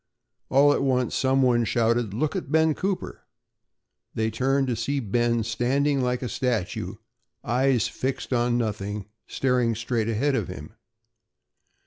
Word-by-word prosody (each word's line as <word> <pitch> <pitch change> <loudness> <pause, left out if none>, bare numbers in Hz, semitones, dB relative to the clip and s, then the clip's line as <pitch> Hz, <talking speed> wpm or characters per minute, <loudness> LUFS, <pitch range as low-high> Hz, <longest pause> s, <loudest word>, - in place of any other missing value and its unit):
All 145 +2 +5
at - - 0
once 130 -2 +1
some 135 0 +2
one 120 -2 +3
shouted: 115 0 +1
"Look 140 +9 -1
at 140 - -4
Ben 160 0 +4
Cooper." 190 +4 -3 0.9
They 110 0 0
turned 135 +3 +1
to 125 -2 -1
see 140 +5 -1
Ben 120 0 +1
standing 135 +5 +1
like 125 0 -1
a - - -2
statue, 120 -7 -2 0.5
eyes 125 -1 +2
fixed 130 0 -3
on 120 0 +2
nothing, 105 -3 -3 0.2
staring 125 -3 +1
straight 115 0 -1
ahead 130 +6 +1
of 130 - -1
him. 95 +3 -9
125 Hz, 140 wpm, -25 LUFS, 115-135 Hz, 0.9 s, All